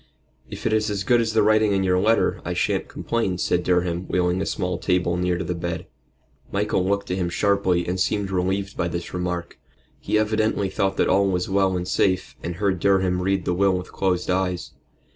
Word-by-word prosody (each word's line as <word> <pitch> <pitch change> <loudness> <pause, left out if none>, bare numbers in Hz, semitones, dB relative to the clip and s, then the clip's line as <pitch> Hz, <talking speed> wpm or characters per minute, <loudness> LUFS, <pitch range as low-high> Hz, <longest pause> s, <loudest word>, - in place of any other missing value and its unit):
"If - - -8
it - - +2
is 110 0 +1
as 100 -1 -2
good 120 +3 +3
as 110 -1 -1
the 110 -1 +4
writing 110 -1 +3
in 95 -1 +1
your 90 -1 +2
letter, 110 +4 +2
I - - -3
shan't - - 0
complain," 110 -6 -2
said 90 0 +1
Durham, 90 0 0
wheeling 90 0 +1
a - - -2
small 90 -2 -2
table 90 -2 +1
near 90 0 0
to 95 - -3
the 90 +1 -2
bed. 85 0 -4 0.7
Michael - - 0
looked 100 0 -1
at 90 - -1
him 90 -2 -1
sharply, 95 -1 +1
and 90 +1 -2
seemed 100 +1 0
relieved 95 +2 -1
by 85 - -1
this 85 0 -5
remark. 90 -1 -4 0.4
He - - 0
evidently 110 -2 +1
thought 95 +1 -1
that - - +2
all 100 +1 +3
was 90 -1 -1
well 95 -1 +2
and 90 0 -4
safe, 95 0 0
and 85 0 -4
heard 95 -1 0
Durham 95 -1 +2
read 95 -1 0
the 90 - +1
will 95 +1 +2
with 90 - -7
closed 90 -2 0
eyes. 90 -1 -1
95 Hz, 210 wpm, -23 LUFS, 90-100 Hz, 0.7 s, the